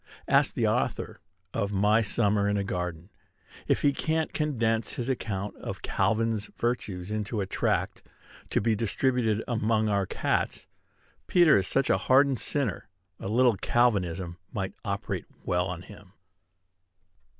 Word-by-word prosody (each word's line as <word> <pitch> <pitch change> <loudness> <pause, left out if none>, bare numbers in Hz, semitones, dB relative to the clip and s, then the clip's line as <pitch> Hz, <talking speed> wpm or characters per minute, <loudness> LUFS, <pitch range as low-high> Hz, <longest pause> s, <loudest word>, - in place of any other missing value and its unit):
Ask - - +3
the - - +2
author - - -1 0.3
of 100 0 -1
"My 105 +3 +3
Summer 105 -2 +2
in 105 - +1
a 100 - 0
Garden" 90 -1 -4 0.6
if - - +1
he 140 - +4
can't 160 +2 -1
condense 115 -7 0
his 125 +1 -3
account 105 -6 -3
of - - -7
"Calvin's" 110 -1 0
virtues 105 -6 -2
into 105 +1 -2
a 100 - 0
tract, - - -1 0.5
to - - +1
be 110 +1 +2
distributed 115 0 0
among 110 -2 +1
our 100 -2 +1
cats. - - -1 0.6
Peter 175 -4 +6
is 95 -2 +2
such 135 - +2
a - - +3
hardened 135 -1 +4
sinner, 135 -10 -2 0.3
a - - -5
little 120 0 +3
Calvinism 95 -8 +1
might 95 -5 -3
operate 100 0 -3 0.2
well 90 0 +1
on 90 -1 -5
him. 100 -2 -14
105 Hz, 140 wpm, -28 LUFS, 100-120 Hz, 0.6 s, Peter